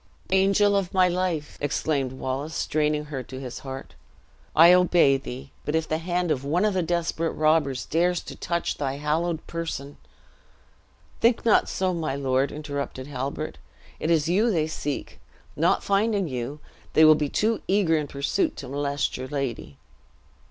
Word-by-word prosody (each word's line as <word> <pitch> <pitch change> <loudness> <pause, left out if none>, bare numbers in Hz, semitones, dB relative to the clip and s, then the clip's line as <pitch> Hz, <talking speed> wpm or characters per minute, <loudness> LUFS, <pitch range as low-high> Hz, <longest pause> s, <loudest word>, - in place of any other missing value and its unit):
"Angel 200 +2 +4
of 195 -2 -1
my 185 -1 +5
life," 175 -4 -2
exclaimed 145 -2 0
Wallace, 135 +4 -4
straining 150 0 0
her 145 -3 -5
to 130 +1 -9
his 125 -2 -6
heart, 135 -1 -8 0.6
"I 170 +3 +8
obey 175 -6 +5
thee. 135 +1 -8
But 150 - -2
if 160 -1 0
the 155 - -1
hand 175 0 -1
of 135 -3 -1
one 170 +8 +1
of 210 - +2
the 185 - +1
desperate 165 -1 -1
robbers 155 -4 +1
dares 175 +2 +1
to - - -9
touch 170 0 -2
thy 135 -2 -1
hallowed 160 +3 -1
person 160 -4 -5 0.6
" - - -33
"Think 235 0 +3
not 225 - +4
so, 185 -1 0
my 160 -5 -2
lord," 135 0 +1
interrupted 140 -3 -5
Halbert; 140 +2 -4 0.4
"it 155 - -2
is 160 -2 +3
you 205 +7 +3
they 165 -7 +1
seek. 150 -2 -5 0.4
Not - - +2
finding 200 -1 +1
you, 130 +2 -4 0.3
they 160 - +7
will 155 - +9
be 150 -1 -1
too 220 +7 0
eager 190 -4 +3
in 150 -2 -1
pursuit 145 - -1
to - - -8
molest 140 +1 -1
your 130 +1 -5
lady." 130 - -4
155 Hz, 165 wpm, -25 LUFS, 140-175 Hz, 0.6 s, will